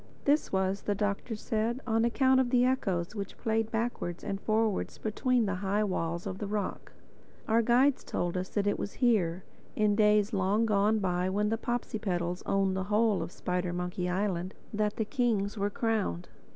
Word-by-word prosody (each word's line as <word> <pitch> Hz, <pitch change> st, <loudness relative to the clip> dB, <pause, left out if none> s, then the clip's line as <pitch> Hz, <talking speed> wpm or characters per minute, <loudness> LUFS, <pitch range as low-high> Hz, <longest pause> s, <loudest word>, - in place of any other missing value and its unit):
This 290 Hz, +2 st, +2 dB
was, 190 Hz, +1 st, 0 dB
the 205 Hz, -, -1 dB
Doctor 205 Hz, +3 st, -2 dB
said, 225 Hz, +3 st, -1 dB
on 225 Hz, -1 st, +2 dB
account 260 Hz, +3 st, +3 dB
of 260 Hz, -2 st, +2 dB
the 245 Hz, 0 st, +4 dB
echoes 195 Hz, -9 st, 0 dB
which 200 Hz, -2 st, -5 dB
played 225 Hz, -1 st, 0 dB
backwards 225 Hz, -6 st, -3 dB
and 195 Hz, -1 st, -3 dB
forwards 220 Hz, -1 st, 0 dB
between 240 Hz, +2 st, +1 dB
the 195 Hz, -, -1 dB
high 205 Hz, +2 st, +1 dB
walls 170 Hz, -3 st, -2 dB
of 190 Hz, +2 st, -5 dB
rock. 205 Hz, -2 st, -3 dB, 0.6 s
Our 225 Hz, +1 st, +4 dB
guides 250 Hz, +4 st, +3 dB
told 175 Hz, 0 st, -2 dB
us 185 Hz, 0 st, -2 dB
that 205 Hz, -1 st, -1 dB
it 205 Hz, -, +1 dB
was 200 Hz, -, -4 dB
here, 190 Hz, -8 st, +1 dB, 0.3 s
in 210 Hz, -1 st, +2 dB
days 210 Hz, 0 st, +3 dB
long 200 Hz, +3 st, +2 dB
gone 210 Hz, 0 st, +3 dB
by 180 Hz, -2 st, 0 dB
when 205 Hz, +2 st, +1 dB
the 225 Hz, -, +1 dB
Popsipetels 190 Hz, -8 st, -2 dB
owned 195 Hz, -1 st, +2 dB
the 190 Hz, 0 st, -2 dB
whole 210 Hz, 0 st, +2 dB
of -, -, -4 dB
Spidermonkey 180 Hz, 0 st, -2 dB
Island, 185 Hz, -1 st, -1 dB, 0.2 s
that 210 Hz, 0 st, 0 dB
the 220 Hz, -, -1 dB
kings 220 Hz, -5 st, 0 dB
were 200 Hz, -1 st, 0 dB
crowned. 210 Hz, -, -1 dB
205 Hz, 175 wpm, -30 LUFS, 190-225 Hz, 0.6 s, the